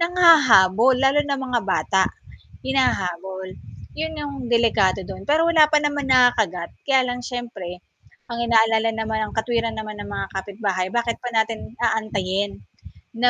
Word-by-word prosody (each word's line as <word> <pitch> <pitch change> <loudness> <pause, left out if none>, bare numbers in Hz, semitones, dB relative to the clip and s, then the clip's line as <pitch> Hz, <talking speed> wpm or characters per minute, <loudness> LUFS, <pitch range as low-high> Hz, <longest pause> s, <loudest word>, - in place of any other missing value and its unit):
nanghahabol 265 - +5
lalo 270 +3 +3
na 280 - 0
mga 255 -3 -2
bata, 190 -1 +1 0.5
hinahabol. 190 -8 -2 0.5
Yun 320 0 -3
yung 285 -1 -6
delikado 225 -5 +2
don, 190 +1 -9
pero 305 +3 +3
wala 315 -2 +6
pa 300 0 +2
naman 290 -1 -1
nakakagat 230 -9 +2 0.2
kaya 265 -2 +4
lang 245 -1 -3
siyempre, 230 -8 -7 0.5
ang 235 - -4
inaalala 225 -1 +3
naman 220 -1 -2
ang - - -11
katwiran 230 0 -1
naman 215 -1 -7
ng 205 - -7
mga 200 -1 -4
kapitbahay 195 -1 -3
bakit 235 -1 -1
pa 245 -1 -7
natin 220 0 -2
aantayin 205 - -2 0.5
na 245 +2 +3
225 Hz, 145 wpm, -22 LUFS, 200-255 Hz, 0.5 s, wala